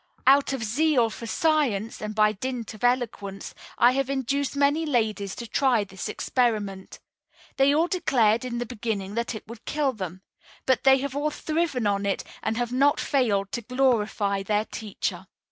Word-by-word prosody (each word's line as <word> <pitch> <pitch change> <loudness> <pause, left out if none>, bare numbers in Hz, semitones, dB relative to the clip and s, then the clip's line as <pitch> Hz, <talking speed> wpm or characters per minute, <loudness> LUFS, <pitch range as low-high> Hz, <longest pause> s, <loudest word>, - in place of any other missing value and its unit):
Out 275 +1 +5
of 265 -4 -3
zeal 245 0 +2
for 230 - -7
science, 245 -7 0
and 215 0 -5
by 215 -1 +4
dint 235 +1 -5
of 215 - -13
eloquence, 230 -6 -1 0.2
I 240 +1 +6
have 270 0 -1
induced 275 +1 -1
many 285 +3 +2
ladies 220 -9 -1
to 235 - -6
try 245 -2 +2
this 190 -2 -6
experiment. 210 -6 -1 0.6
They 270 +1 +5
all 325 +3 +3
declared, 235 - +2
in 245 -2 -4
the 240 - -2
beginning, 215 -4 -4
that 235 +1 -2
it 220 - -9
would 230 0 -10
kill 290 -3 0
them; 185 -3 -7 0.4
but 260 0 +1
they 265 0 +7
have 280 -1 -4
all 290 +1 0
thriven 310 -5 -1
on 200 0 +1
it 195 - -1 0.2
and 220 +1 -2
have 240 -1 -1
not 280 +3 +3
failed 210 -8 +1
to 240 - -3
glorify 215 -5 +1
their 210 +2 0
teacher. 215 -3 -5
235 Hz, 175 wpm, -25 LUFS, 210-270 Hz, 0.6 s, they